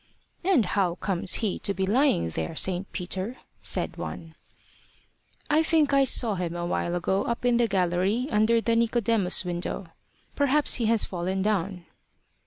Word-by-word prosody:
"And 345 Hz, -, +3 dB
how 180 Hz, -2 st, 0 dB
comes 180 Hz, -2 st, +1 dB
he 200 Hz, -, -2 dB
to 200 Hz, -, -2 dB
be 190 Hz, -, -1 dB
lying 210 Hz, -, +2 dB
there, 80 Hz, -, -4 dB
St. 185 Hz, +3 st, 0 dB
Peter?" 190 Hz, +6 st, -4 dB, 0.2 s
said -, -, -2 dB
one. 165 Hz, -1 st, -7 dB, 1.1 s
"I 305 Hz, +1 st, +3 dB
think 315 Hz, -3 st, +2 dB
I 275 Hz, 0 st, +4 dB
saw 235 Hz, -4 st, +5 dB
him 175 Hz, -3 st, -4 dB
a 175 Hz, 0 st, -3 dB
while 175 Hz, 0 st, -2 dB
ago 190 Hz, +3 st, -1 dB
up 235 Hz, +1 st, -3 dB
in 245 Hz, -1 st, +3 dB
the 235 Hz, -1 st, +2 dB
gallery, 190 Hz, +5 st, 0 dB
under 220 Hz, +2 st, +3 dB
the 230 Hz, 0 st, 0 dB
Nicodemus 230 Hz, -5 st, +1 dB
window. 175 Hz, +2 st, -4 dB, 0.5 s
Perhaps 285 Hz, +1 st, +3 dB
he 225 Hz, -, +1 dB
has 225 Hz, -1 st, +3 dB
fallen 185 Hz, +1 st, -3 dB
down. 190 Hz, -3 st, -2 dB
200 Hz, 160 wpm, -26 LUFS, 180-235 Hz, 1.1 s, saw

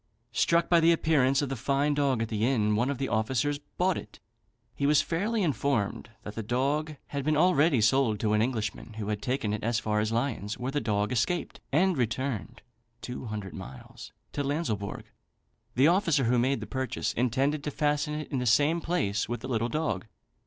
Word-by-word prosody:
Struck 170 Hz, 0 st, +2 dB
by 170 Hz, -, +5 dB
the 165 Hz, +1 st, +5 dB
appearance 145 Hz, -4 st, +3 dB
of 140 Hz, -, -2 dB
the 135 Hz, -, -2 dB
fine 140 Hz, +4 st, +1 dB
dog 140 Hz, -5 st, +1 dB
at 115 Hz, -, -5 dB
the 110 Hz, -1 st, -1 dB
inn, 110 Hz, -4 st, +2 dB
one 120 Hz, +5 st, +1 dB
of 140 Hz, -, -2 dB
the 135 Hz, +1 st, -2 dB
officers 130 Hz, +6 st, 0 dB, 0.2 s
bought 185 Hz, 0 st, +2 dB
it. -, -, -13 dB, 0.5 s
He 140 Hz, -, 0 dB
was 150 Hz, 0 st, +4 dB
fairly 210 Hz, +6 st, -1 dB
informed 135 Hz, -, -1 dB
that 105 Hz, -, -7 dB
the 115 Hz, -, -4 dB
dog 140 Hz, +7 st, -1 dB
had 140 Hz, -1 st, -3 dB
been 155 Hz, +1 st, +1 dB
already 155 Hz, -6 st, +4 dB
sold 115 Hz, -1 st, +3 dB
to 105 Hz, -1 st, +1 dB
an 105 Hz, -, +3 dB
Englishman, 110 Hz, -2 st, -2 dB
who 105 Hz, -1 st, -5 dB
had 105 Hz, -1 st, -2 dB
taken 125 Hz, -5 st, -1 dB
it 105 Hz, -, -4 dB
as 115 Hz, +1 st, +1 dB
far 105 Hz, -2 st, 0 dB
as 105 Hz, +1 st, 0 dB
Lyons, 115 Hz, -3 st, -2 dB
where 125 Hz, +2 st, -3 dB
the 145 Hz, -, -1 dB
dog 105 Hz, -1 st, 0 dB
escaped, 140 Hz, +8 st, -1 dB
and 170 Hz, +2 st, +2 dB
returned 120 Hz, -1 st, -2 dB, 0.4 s
(two 125 Hz, +1 st, -6 dB
hundred 105 Hz, -4 st, -5 dB
miles) 95 Hz, -9 st, -10 dB, 0.2 s
to 145 Hz, -, -1 dB
Lanslebourg. 135 Hz, -, -2 dB, 0.7 s
The 130 Hz, +5 st, +5 dB
officer 170 Hz, -5 st, +3 dB
who 120 Hz, +1 st, +3 dB
made 130 Hz, +3 st, +1 dB
the -, -, -4 dB
purchase 130 Hz, -4 st, -2 dB
intended 135 Hz, +5 st, 0 dB
to 150 Hz, -, -2 dB
fasten 150 Hz, +1 st, 0 dB
it 155 Hz, +1 st, -6 dB
in 135 Hz, -, 0 dB
the 125 Hz, -, -1 dB
same 145 Hz, +8 st, +3 dB
place 105 Hz, -, -1 dB
with 120 Hz, -1 st, -3 dB
the -, -, -6 dB
little 120 Hz, -2 st, 0 dB
dog. 155 Hz, -6 st, -2 dB
130 Hz, 200 wpm, -28 LUFS, 110-150 Hz, 0.7 s, by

